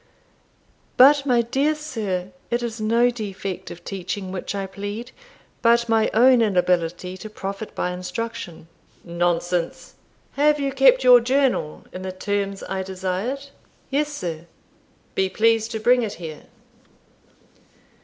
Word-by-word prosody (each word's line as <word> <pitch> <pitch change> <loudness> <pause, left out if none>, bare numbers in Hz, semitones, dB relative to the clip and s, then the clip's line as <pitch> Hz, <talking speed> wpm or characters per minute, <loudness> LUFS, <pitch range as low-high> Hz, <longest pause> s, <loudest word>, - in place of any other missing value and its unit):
"But, 280 +2 +7
my 240 -2 +3
dear 275 +6 +1
sir, 210 -12 -4 0.2
it 240 0 -1
is 230 -2 -4
no 235 +3 +3
defect 200 -5 -5
of 175 - -10
teaching 190 0 -4
which 190 +2 -4
I 195 -1 -2
plead, 205 +5 -6 0.5
but 235 0 +4
my 225 -1 +3
own 245 +2 +5
inability 180 -3 +1
to 215 - -8
profit 200 0 -6
by 180 - -1
instruction." 180 -2 -6 0.4
"Nonsense. 175 0 -1 0.4
Have 295 +1 +3
you 275 -1 -1
kept 265 -1 +5
your 250 -1 +8
journal 255 - 0
in 185 - -6
the 185 0 -4
terms 200 +1 -3
I 190 0 -3
desired?" 190 +9 -3 0.4
"Yes, 295 +2 0
sir." 170 - -5 0.7
"Be 190 0 +1
pleased 225 +2 +2
to 220 - -4
bring 245 +3 +4
it 220 -3 -3
here." 160 -3 -9
215 Hz, 135 wpm, -23 LUFS, 185-245 Hz, 0.7 s, your